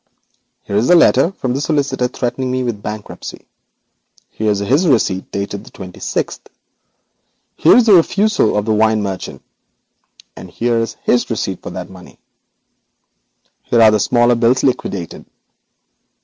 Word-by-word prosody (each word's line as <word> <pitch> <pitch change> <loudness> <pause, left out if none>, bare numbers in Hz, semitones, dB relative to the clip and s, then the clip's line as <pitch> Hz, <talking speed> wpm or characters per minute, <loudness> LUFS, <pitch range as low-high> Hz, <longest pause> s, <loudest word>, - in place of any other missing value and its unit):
Here 100 - -5
is 110 - +1
the - - +5
communication 170 +1 +4
from 130 -9 -3
the 135 - -2
solicitor 140 -5 0
threatening 125 +1 -3
me 130 0 -1
with 115 -4 -4
bankruptcy; 105 0 -8 0.9
here 110 0 -2
is 105 - +1
his 135 - +1
receipt 100 - +1
dated 100 0 -4
the - - -14
twenty 90 -1 -11
sixth; - - -3 1.1
here - - +5
is 245 - +5
the 215 - +6
refusal 195 - +3
of 105 - -1
the 110 - +1
wine 110 0 +2
merchant, 95 -2 -6 0.9
and - - -11
here 120 0 -1
is 115 - -3
his 120 - +1
receipt 95 -5 -3
for - - -7
the 90 -1 -6
money. 90 0 -15 1.4
Here 120 - 0
are 110 -1 +5
smaller 120 +3 +3
bills 120 +2 +2
liquidated. 100 - -2
115 Hz, 150 wpm, -17 LUFS, 105-130 Hz, 1.4 s, the